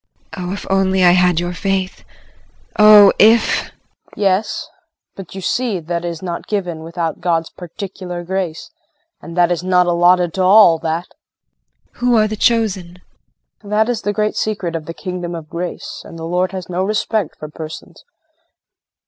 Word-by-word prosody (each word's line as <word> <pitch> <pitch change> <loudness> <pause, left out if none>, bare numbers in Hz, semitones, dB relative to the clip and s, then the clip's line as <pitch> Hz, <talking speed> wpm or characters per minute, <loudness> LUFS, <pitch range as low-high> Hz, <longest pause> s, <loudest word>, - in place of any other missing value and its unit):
JULIE. 180 -2 -5
Oh, - - -3
if 205 - -7
I - - -1
only 190 0 +2
had 180 -1 +4
your 175 0 -3
faith. 190 +1 -2 0.8
Oh, 210 -2 +8
if 225 +2 +5
KRISTIN. - - -10 0.4
Yes, 195 +1 0 0.5
but 195 -1 -10
you 190 - -6
see 230 -1 -1
that 170 +1 -4
is 170 0 -5
not 170 -2 -5
given 180 -6 -3
without 165 -1 -4
God's 165 -2 0
particular 180 -1 -7
grace, 185 - -4 0.5
and 170 +1 -10
that 175 0 +3
is 175 0 -1
not 180 -1 +3
allotted 175 0 +3
to 190 - -2
all, 185 -3 +6
that! 165 +2 -2 0.9
JULIE. - - -25
Who 245 -1 +3
are 215 0 +3
the 215 - -4
chosen? 200 -6 0 0.6
KRISTIN. 205 - -13
That 215 +2 +2
is 240 -3 -1
the 205 - -1
great 210 +1 -1
secret 195 -6 -2
of 160 -2 -5
the 165 - -6
Kingdom 180 -2 -5
of 160 -2 -8
Grace, 175 +1 -6
and 165 - -11
the 165 - -6
Lord 180 +2 0
has 185 -2 -6
no 180 +1 -2
respect 215 -2 -1
for 155 - -7
persons. 155 +1 -10
180 Hz, 175 wpm, -18 LUFS, 170-200 Hz, 0.9 s, Oh